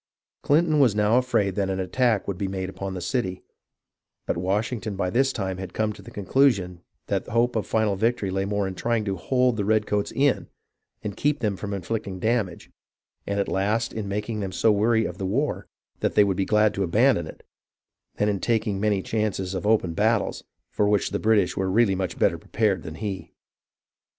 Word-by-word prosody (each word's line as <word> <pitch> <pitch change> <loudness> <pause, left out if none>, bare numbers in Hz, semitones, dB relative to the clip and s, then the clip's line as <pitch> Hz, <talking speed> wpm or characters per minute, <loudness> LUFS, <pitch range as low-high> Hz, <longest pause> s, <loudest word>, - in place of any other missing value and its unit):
Clinton 155 +1 +3
was 125 -7 +4
now 105 +3 +4
afraid 105 -6 +1
that 95 0 -1
an 95 0 -2
attack 110 +3 +1
would 95 -2 -3
be 100 - -1
made 95 -1 -3
upon 95 0 -5
the 90 - -5
city; 95 -7 -2 0.8
but - - -1
Washington 105 +4 -1
had - - -8
by 90 -2 -1
this 135 +4 +2
time 95 -6 -3
come 110 +4 -1
to - - -13
the - - -12
conclusion 100 -5 +1 0.2
that - - -2
hope 120 +2 +1
of 110 - -1
final 110 -3 +1
victory 110 -1 0
lay 95 +1 0
more 100 0 -1
in 95 - -4
trying 115 +2 -1
to 100 -2 -1
hold 125 +6 +1
the 105 - 0
redcoats 105 -1 +1
in 140 0 +1 0.6
and 105 -2 -4
keep 150 0 +1
them 105 -6 -1
from 100 +1 -6
inflict 100 +3 -3
ing 95 -1 -5
damage, 110 -3 -1 0.6
and 100 0 -1
at 100 - 0
last 105 +4 0
in 110 -2 -4
making 105 +2 -3
them 95 -2 -3
so 110 +4 +3
weary 110 +2 +2
of - - -6
the 95 - -2
war 140 +10 -1 0.3
that - - -1
they 105 - +7
would 100 -2 +1
be 100 - +1
glad 105 +1 +3
to 100 - -3
abandon 95 - +3
it, - - -12 0.7
than 105 - +1
in 100 -2 0
tak 115 0 +1
ing 100 -3 -2
many 100 -2 +1
chances 100 -4 -2
of 95 +2 -3
open 105 -6 +2
battles, - - +1 0.3
for 105 - +1
which 105 -1 +1
the - - -1
British 105 -4 +2
were 95 0 -1
really 105 +1 +3
much 95 -2 -3
better - - +2
prepared 100 -5 0
than 80 0 -8
he. 100 0 -5
105 Hz, 205 wpm, -25 LUFS, 95-115 Hz, 0.8 s, they